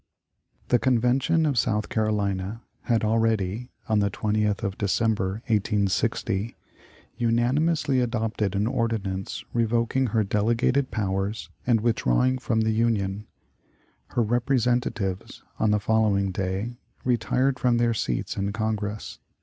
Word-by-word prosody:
The 125 - +4
Convention 130 +6 +2
of 140 -5 +2
South 105 -2 0
Carolina 105 -1 -1 0.2
had 115 -2 +1
already 110 0 0 0.2
(on 110 -1 +2
the 100 -1 +2
20th 105 +1 0
of 100 -2 -2
December, 105 0 0
1860) 105 -1 0 0.6
unanimously 130 +5 +2
adopted 115 -4 -1
an 100 +2 +1
ordinance 110 -6 -2
revoking 120 +3 +1
her 110 -1 +1
delegated 115 +6 +1
powers 100 0 -2 0.2
and 115 -3 +3
withdrawing 120 - +2
from 115 -3 0
the 110 0 +1
Union. 105 -3 0 0.8
Her 120 - 0
representatives, 120 -5 0 0.2
on 110 - +2
the 105 0 +3
following 100 -2 +2
day, 95 +6 -3 0.3
retired 125 +2 +1
from 125 -2 +2
their 120 0 +2
seats 65 - -2
in 100 +1 -1
Congress. 105 -1 -3
110 Hz, 115 wpm, -25 LUFS, 100-120 Hz, 0.8 s, The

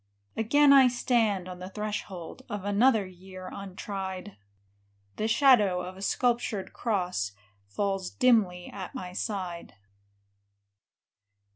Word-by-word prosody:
Again 280 +6 +5
I 270 -2 +8
stand 230 -6 +1
on 180 -1 -8
the 185 +1 -7
threshold 205 -2 -5
Of 205 -3 -5
another 215 +1 +3
year 185 0 -10
untried; 190 0 -6 0.8
The 215 - 0
shadow 225 -7 +4
of 180 +1 -7
a 190 - -11
sculptured 235 -2 0
cross 180 - -1 0.3
Falls 195 - -2
dimly 210 -9 +2
at 190 -3 -8
my 180 -1 -6
side. 185 -4 -4
200 Hz, 110 wpm, -28 LUFS, 185-225 Hz, 0.8 s, I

